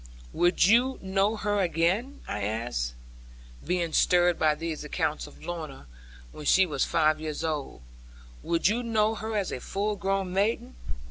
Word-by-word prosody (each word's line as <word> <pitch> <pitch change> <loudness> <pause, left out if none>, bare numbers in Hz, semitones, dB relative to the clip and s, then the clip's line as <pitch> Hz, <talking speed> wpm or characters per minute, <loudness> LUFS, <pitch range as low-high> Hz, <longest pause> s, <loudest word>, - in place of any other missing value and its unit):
'Would 175 0 +3
you 245 +6 +4
know 195 +3 +1
her 205 -1 0
again?' 185 - 0
I 105 - -3
asked, 105 - -2 0.7
being 175 -1 -1
stirred 175 -1 +4
by 155 -1 +3
these 160 -1 -4
accounts 155 0 -2
of - - -15
Lorna, 155 - -6 0.5
when 150 - -9
she 190 +6 +5
was 145 -6 -1
five 155 -1 +2
years 155 0 -4
old: 150 - -3 0.6
'would 170 0 +1
you 225 +4 +1
know 220 -2 +1
her 220 0 -3
as 200 -3 -1
a - - -4
full 205 +9 -2
grown 195 -1 -1
maiden?' 200 - 0
175 Hz, 155 wpm, -27 LUFS, 155-205 Hz, 0.7 s, she